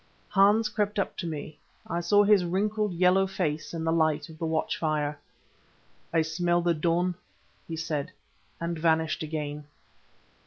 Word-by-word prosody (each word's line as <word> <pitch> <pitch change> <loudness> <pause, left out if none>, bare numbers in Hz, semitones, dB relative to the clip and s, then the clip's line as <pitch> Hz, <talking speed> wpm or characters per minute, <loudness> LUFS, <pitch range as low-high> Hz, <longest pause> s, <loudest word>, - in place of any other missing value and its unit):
Hans 205 +3 +4
crept 210 -1 -1
up 200 - -1
to 175 - -3
me; 155 -1 -6 0.3
I 170 - -2
saw 205 +4 +4
his 205 -2 +5
wrinkled, 210 +4 0
yellow 180 +2 +3
face 155 -5 -2
in 165 -1 -4
the 165 - +1
light 155 -2 +1
of 160 -1 -13
the 165 - -1
watch 160 0 0
fire. 150 -2 -1 0.9
"I 165 -1 +3
smell 175 +2 0
the 175 -1 +3
dawn," 170 +3 +1 0.5
he 165 - -4
said 155 0 -3 0.5
and 170 -1 -3
vanished 160 -1 +1
again. 150 -1 -4
165 Hz, 155 wpm, -28 LUFS, 155-185 Hz, 0.9 s, his